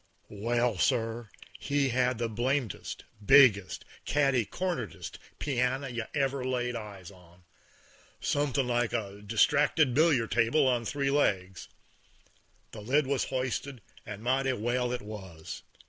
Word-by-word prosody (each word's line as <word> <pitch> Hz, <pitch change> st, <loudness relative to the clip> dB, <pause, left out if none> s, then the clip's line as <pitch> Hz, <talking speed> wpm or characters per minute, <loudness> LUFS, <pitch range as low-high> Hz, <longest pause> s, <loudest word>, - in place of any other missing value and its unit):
Well, 115 Hz, 0 st, 0 dB
sir, 115 Hz, -2 st, 0 dB, 0.3 s
he 140 Hz, -1 st, 0 dB
had 125 Hz, 0 st, +1 dB
the 120 Hz, 0 st, -1 dB
blamedest, 120 Hz, 0 st, -2 dB, 0.2 s
biggest, 110 Hz, -6 st, +5 dB, 0.2 s
catty 135 Hz, -5 st, +2 dB
cornerdest 170 Hz, -, -4 dB, 0.2 s
pianner 130 Hz, 0 st, -1 dB
you 120 Hz, -2 st, -4 dB
ever 135 Hz, -2 st, 0 dB
laid 125 Hz, -1 st, -1 dB
eyes 100 Hz, -4 st, -8 dB
on; 90 Hz, -1 st, -19 dB, 0.8 s
somethin' 140 Hz, -2 st, 0 dB
like 120 Hz, -1 st, 0 dB
a 100 Hz, -3 st, -4 dB
distracted 125 Hz, +6 st, +3 dB
billiard 145 Hz, -6 st, +3 dB
table 120 Hz, +5 st, +3 dB
on 120 Hz, -2 st, +1 dB
three 140 Hz, +1 st, -1 dB
legs. 95 Hz, -10 st, 0 dB, 1.0 s
The 110 Hz, -, -9 dB
lid 135 Hz, +7 st, +2 dB
was 135 Hz, 0 st, 0 dB
hoisted, 130 Hz, -1 st, -3 dB, 0.2 s
and 105 Hz, +1 st, -8 dB
mighty 130 Hz, +2 st, +1 dB
well 120 Hz, +2 st, -1 dB
it 125 Hz, -2 st, -3 dB
was. 95 Hz, -7 st, -8 dB
120 Hz, 125 wpm, -29 LUFS, 110-135 Hz, 1.0 s, biggest